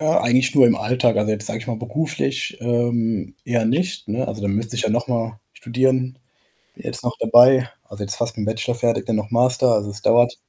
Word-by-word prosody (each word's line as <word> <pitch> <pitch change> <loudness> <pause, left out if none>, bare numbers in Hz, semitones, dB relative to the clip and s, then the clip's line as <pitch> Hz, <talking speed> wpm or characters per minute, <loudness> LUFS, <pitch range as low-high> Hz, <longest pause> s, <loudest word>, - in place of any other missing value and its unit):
Äh, 155 - -3
eigentlich 130 -3 +2
nur 135 - +7
im 120 - +4
Alltag. 125 -3 +1
Also, 105 +1 +1
jetzt 105 0 -3
sage 110 - -4
ich 115 - -10
mal, 120 - -2
beruflich, 140 +1 -3
ähm, 115 -5 -1
eher 120 -2 0
nicht, 175 +10 -1
ne? 115 +5 -2
Also, 105 - -6
da 100 - -2
müsste 110 +4 -2
ich 120 - -1
ja - - 0
noch 120 +2 -1
mal 115 -3 -3
studieren. 130 +1 -1 0.6
Bin - - -14
jetzt - - -5
noch 120 - -2
dabei 125 +2 +6 0.2
also, 100 0 -10
jetzt 100 0 -3
fast 115 -1 -3
mit 105 - -3
'n - - -4
Bachelor 115 +2 -2
fertig, 120 -1 -1
dann 115 - 0
noch 105 0 -4
Master 125 +1 +2
also, 105 -2 0
es 100 +1 -9
dauert 120 +1 +4
120 Hz, 230 wpm, -21 LUFS, 110-125 Hz, 0.6 s, nur